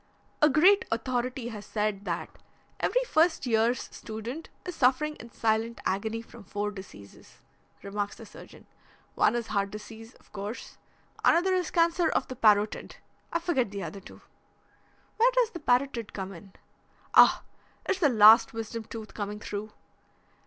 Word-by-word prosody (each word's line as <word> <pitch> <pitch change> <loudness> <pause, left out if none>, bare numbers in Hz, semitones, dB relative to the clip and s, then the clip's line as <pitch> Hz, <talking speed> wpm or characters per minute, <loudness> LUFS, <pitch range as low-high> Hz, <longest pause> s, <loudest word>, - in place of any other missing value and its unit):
"A 300 - +6
great 360 +8 +5
authority 245 +1 -2
has 210 -3 -8
said 210 -2 -2
that 170 -2 -5 0.4
every - - +1
first 335 - +2
year's 230 +1 +2
student 230 +8 -7 0.2
is 360 - -4
suffering 285 +3 +2
in 235 - -11
silent 225 +1 0
agony 220 +4 -2
from 230 -1 -14
four 205 +2 -3
diseases," 185 - -13 0.5
remarks 205 +1 -3
the - - -11
surgeon. - - -14 0.5
"One - - +3
is 240 -1 -2
heart 200 -1 0
disease, 225 +3 -10
of - - -25
course; 205 +3 -7 0.4
another 365 +3 +4
is 365 -3 0
cancer 335 0 +2
of - - 0
the 255 - -5
parotid. 210 -2 +2 0.4
I - - +1
forget 310 - 0
the 200 - -8 0.2
two - - -13
other." - - -20 0.9
"Where 480 +3 +5
does 485 -2 +3
the 345 - -7
parotid 245 -4 0
come 195 -1 -5
in?" 190 +2 -13 0.6
"Oh, - - +7 0.4
it's 385 - 0
the 305 -6 +4
last 225 0 +7
wisdom 225 0 -5
tooth 220 -1 -9
coming 205 0 -5
through!" 210 +1 -6
230 Hz, 150 wpm, -28 LUFS, 210-295 Hz, 0.9 s, Oh